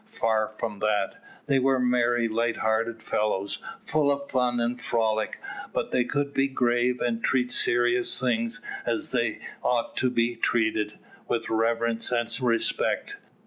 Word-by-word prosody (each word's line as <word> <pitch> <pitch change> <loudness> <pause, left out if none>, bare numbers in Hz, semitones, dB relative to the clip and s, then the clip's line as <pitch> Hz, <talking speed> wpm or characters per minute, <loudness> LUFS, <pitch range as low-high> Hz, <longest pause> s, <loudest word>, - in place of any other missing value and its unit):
Far 110 - +1
from 105 -3 -4
that. 105 -2 0 0.2
They 140 -2 +3
were 135 0 +3
merry, 120 -1 +2
light 115 +1 0
hearted 110 +1 0
fellows, 100 -2 -1 0.2
full 150 -2 +1
of 140 0 -3
fun 125 -2 +1
and 120 +1 -1
frolic, 110 -2 0 0.4
but - - -2
they 125 - +2
could 140 +1 -1
be 135 0 +2
grave, 125 -1 +1
and 115 -1 -1
treat 125 -1 +2
serious 120 0 +2
things 115 -1 0 0.2
as 115 -1 -1
they 120 -4 0 0.2
ought 120 -1 0
to 130 - +2
be 120 -1 +1
treated, 110 -2 0 0.3
with - - -1
reverence 115 +1 +1
and 120 -2 0
respect. 115 -2 0
120 Hz, 145 wpm, -26 LUFS, 115-125 Hz, 0.4 s, They